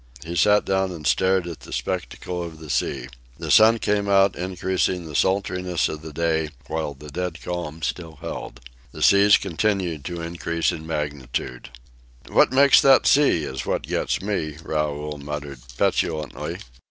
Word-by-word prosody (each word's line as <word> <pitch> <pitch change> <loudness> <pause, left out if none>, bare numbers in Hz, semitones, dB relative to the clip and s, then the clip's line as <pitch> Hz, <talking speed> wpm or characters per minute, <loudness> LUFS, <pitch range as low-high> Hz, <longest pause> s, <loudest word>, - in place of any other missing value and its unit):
He 85 +1 -5
sat 105 +5 +4
down 95 -1 0
and 80 -4 -8
stared 95 +1 +2
at 85 -2 -7
the - - -13
spectacle 90 -1 -4
of 85 -2 -7
the 80 -2 -7
sea. - - -1 0.3
The - - -4
sun 110 +1 +7
came 100 -2 0
out, 95 0 +4
increasing 90 0 -1
the 80 - -9
sultriness 90 0 0
of 75 - -6
the 80 0 -8
day, 80 0 0 0.2
while 75 -1 -3
the 75 +2 -11
dead 90 +1 -4
calm 85 -3 -5
still 80 -3 -4
held. - - -7 0.3
The - - -4
seas 100 +1 +6
continued 95 -4 -1
to 85 +3 -4
increase 85 0 -1
in 80 0 -7
magnitude. 70 -5 -4 0.6
"What - - +4
makes 140 +1 +6
that 135 -1 +6
sea 140 - +4
is 65 -2 -5
what - - -1
gets - - -2
me," 80 -7 -2
Raoul 75 -1 -2
muttered 70 -2 -6 0.2
petulantly. 75 -5 -1
85 Hz, 160 wpm, -23 LUFS, 75-95 Hz, 0.6 s, sun